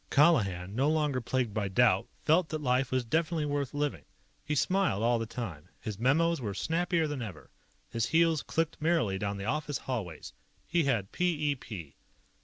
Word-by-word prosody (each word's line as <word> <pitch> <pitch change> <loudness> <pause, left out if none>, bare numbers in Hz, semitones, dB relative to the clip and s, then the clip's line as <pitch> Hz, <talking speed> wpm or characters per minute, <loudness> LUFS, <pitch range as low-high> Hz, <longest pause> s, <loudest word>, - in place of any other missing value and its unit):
Colihan, 100 - +3
no 135 +6 +2
longer 150 -4 +1
plagued 120 -2 -1
by 105 -2 -1
doubt, 105 0 +3 0.2
felt 160 +2 +3
that 155 - -2
life 130 0 +2
was 130 -1 0
definitely 160 +4 0
worth 145 -2 -1
living. 145 0 -2 0.4
He 150 - -2
smiled 185 - +1
all 120 0 +3
the 115 - -3
time. 100 -11 -6
His 105 -2 -6
memos 160 +6 +2
were 105 -4 -3
snappier 170 0 +1
than 145 -3 -4
ever. 95 -9 -8 0.4
His 115 0 0
heels 165 -1 +3
clicked 165 -1 -2
merrily 155 - +1
down 100 0 -2
the 100 - -5
office 145 +2 -1
hallways. 105 -13 -5 0.3
He 170 -3 +1
had 115 -8 0
p 160 -5 +1
e - - +2
p. 90 - -9
130 Hz, 180 wpm, -30 LUFS, 110-155 Hz, 0.4 s, Colihan